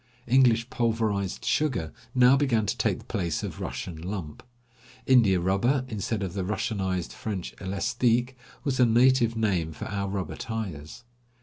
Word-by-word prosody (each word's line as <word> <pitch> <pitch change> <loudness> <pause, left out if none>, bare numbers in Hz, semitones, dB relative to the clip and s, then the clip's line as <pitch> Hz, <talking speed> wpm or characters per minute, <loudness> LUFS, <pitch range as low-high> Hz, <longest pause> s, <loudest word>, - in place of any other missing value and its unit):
English 120 -2 +4
pulverized 110 -5 -1
sugar 105 - 0 0.2
now 125 +1 +6
began 130 -6 +2
to - - -1
take - - 0
the - - -14
place 85 -5 -2
of - - -5
Russian 80 -3 -5
lump. 90 -4 -5 0.6
India 110 -8 +5
rubber, 120 +9 +1
instead 105 -1 -2
of 90 -3 -4
the 95 -1 -2
Russianized 95 -3 -2
French 100 -5 -5
elastique, 120 +6 0 0.3
was 135 -3 -1
the 125 - +5
native 120 0 +4
name 95 -8 0
for - - -7
our 100 -1 -3
rubber 95 -2 -4
tires. 105 -5 -6
110 Hz, 145 wpm, -27 LUFS, 95-120 Hz, 0.6 s, now